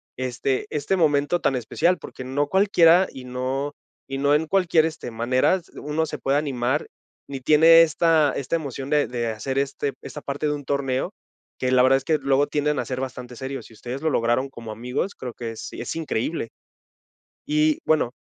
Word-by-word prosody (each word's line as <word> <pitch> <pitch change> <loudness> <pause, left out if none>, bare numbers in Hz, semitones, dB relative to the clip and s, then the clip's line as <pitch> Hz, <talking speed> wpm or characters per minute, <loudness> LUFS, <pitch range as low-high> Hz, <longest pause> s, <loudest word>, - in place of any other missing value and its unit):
este 130 +1 -2
este 150 +6 -1
momento 155 0 +2
tan 135 - +1
especial. 170 +8 +1
Porque - - -9
no 140 +3 -1
cualquiera 185 -1 +5
y 130 -1 -10
no 130 +3 -3 0.3
y 135 - -4
no 140 +1 +3
en 155 +2 +1
cualquier, 170 -3 +3
este, 160 -6 -5
maneras, 130 +10 +1
uno 150 +2 -2
se - - -6
puede 135 +1 +1
animar, 135 -1 -1 0.4
ni 135 -1 -5
tiene 160 +4 +7
esta 160 -2 +3
esta 140 +4 -2
emoción 140 -4 -4
de 150 -1 +2
de 120 -1 -2
hacer 125 +5 -2
este 140 0 -2
esta 150 - -8
parte 140 +2 -4
de 150 - +1
un 145 -1 -5
torneo, 135 -2 -1 0.5
que 130 - 0
la 130 -1 +5
verdad 130 +1 +5
es 135 - -6
que 155 +2 +2
luego 140 +1 +2
tienden 150 0 0
a - - -2
ser 130 -1 -4
bastante 125 -1 -6
serios. 135 +2 -6
Si - - -17
ustedes 125 +5 -6
lo 160 - +2
lograron 120 +2 +1
como 115 -4 -9
amigos, 125 - -3
creo 125 -2 -7
que 115 -1 -5
es 115 - -7
es - - -5
increíble. 155 -4 -2 1.0
Y, 150 0 +2
bueno 155 -6 +2
140 Hz, 190 wpm, -24 LUFS, 130-155 Hz, 1.0 s, tiene